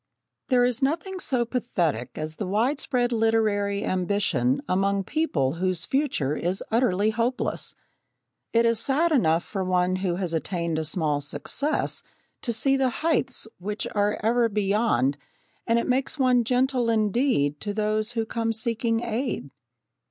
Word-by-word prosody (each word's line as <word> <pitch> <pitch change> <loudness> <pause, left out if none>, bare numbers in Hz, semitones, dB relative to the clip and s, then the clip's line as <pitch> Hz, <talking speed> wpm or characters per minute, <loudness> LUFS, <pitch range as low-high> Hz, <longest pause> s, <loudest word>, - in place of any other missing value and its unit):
There 250 -2 +4
is 245 0 -1
nothing 335 +7 -1
so 255 -8 +1
pathetic 175 - -2
as 155 0 -4
the 205 - -3
widespread 245 +3 +1
literary 215 -3 +1
ambition 180 -9 +1
among 195 +1 +1
people 165 - 0
whose 185 -2 0
future 265 - 0
is 180 +4 -2
utterly 220 -3 +2
hopeless. 235 +3 -1 0.8
It 230 0 +3
is 230 -1 +3
sad 290 +8 +2
enough 170 - +3
for 195 -3 -4
one 185 0 +1
who 185 -2 -1
has 180 -2 -2
attained 170 -1 -1
a 160 - -2
small 150 -3 0
success 280 - -1 0.4
to 240 - -1
see 270 +4 +2
the 265 -1 +2 0.2
heights 265 -8 +1
which 205 +3 -4
are 205 0 +1
ever 235 +1 +3
beyond, 200 - +1 0.5
and 230 - +3
it 235 - 0
makes 260 +4 0
one 250 -3 +3
gentle 250 0 +1
indeed 215 - +1
to 205 - -3
those 215 +2 0
who 225 -1 -1
come 225 0 -1
seeking 230 0 0
aid. 235 - -3
220 Hz, 145 wpm, -25 LUFS, 185-245 Hz, 0.8 s, There